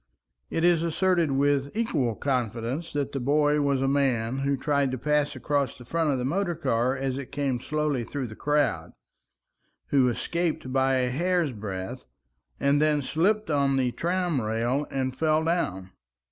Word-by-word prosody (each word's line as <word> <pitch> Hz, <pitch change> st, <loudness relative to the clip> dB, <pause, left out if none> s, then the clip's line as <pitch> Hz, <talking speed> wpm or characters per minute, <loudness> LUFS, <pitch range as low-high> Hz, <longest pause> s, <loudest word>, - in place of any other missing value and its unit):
It 165 Hz, -, -1 dB
is 175 Hz, -2 st, +4 dB
asserted 170 Hz, 0 st, +1 dB
with 140 Hz, +4 st, +1 dB
equal 135 Hz, -, 0 dB
confidence 125 Hz, +4 st, -2 dB
that 145 Hz, -2 st, -1 dB
the 135 Hz, -, -3 dB
boy 145 Hz, +3 st, +2 dB
was 140 Hz, -2 st, +1 dB
a -, -, +2 dB
man 135 Hz, -3 st, +1 dB
who 140 Hz, 0 st, 0 dB
tried 140 Hz, 0 st, +1 dB
to 130 Hz, -, -3 dB
pass 150 Hz, +2 st, 0 dB
across 140 Hz, +1 st, -1 dB
the 125 Hz, -, -12 dB
front 165 Hz, +4 st, 0 dB
of 135 Hz, -, +1 dB
the 125 Hz, -, -2 dB
motor 175 Hz, +4 st, 0 dB
car 130 Hz, -4 st, 0 dB
as 135 Hz, 0 st, -2 dB
it 135 Hz, -, -8 dB
came 140 Hz, -4 st, -1 dB
slowly 150 Hz, -2 st, -1 dB
through 135 Hz, +3 st, -4 dB
the 110 Hz, -2 st, -8 dB
crowd, 150 Hz, +2 st, 0 dB, 1.0 s
who 130 Hz, -3 st, +4 dB
escaped 160 Hz, 0 st, -2 dB
by 135 Hz, 0 st, +3 dB
a 125 Hz, -1 st, +1 dB
hair's 170 Hz, +1 st, +1 dB
breadth, 95 Hz, -, -6 dB, 0.5 s
and 140 Hz, +1 st, +3 dB
then 150 Hz, -2 st, +2 dB
slipped 195 Hz, +7 st, +1 dB
on 140 Hz, -2 st, +2 dB
the 125 Hz, -2 st, +1 dB
tram 175 Hz, -2 st, -1 dB
rail 115 Hz, +6 st, -1 dB
and 130 Hz, -1 st, -2 dB
fell 155 Hz, +1 st, +2 dB
down. 95 Hz, -, -1 dB
140 Hz, 170 wpm, -26 LUFS, 130-155 Hz, 1.0 s, is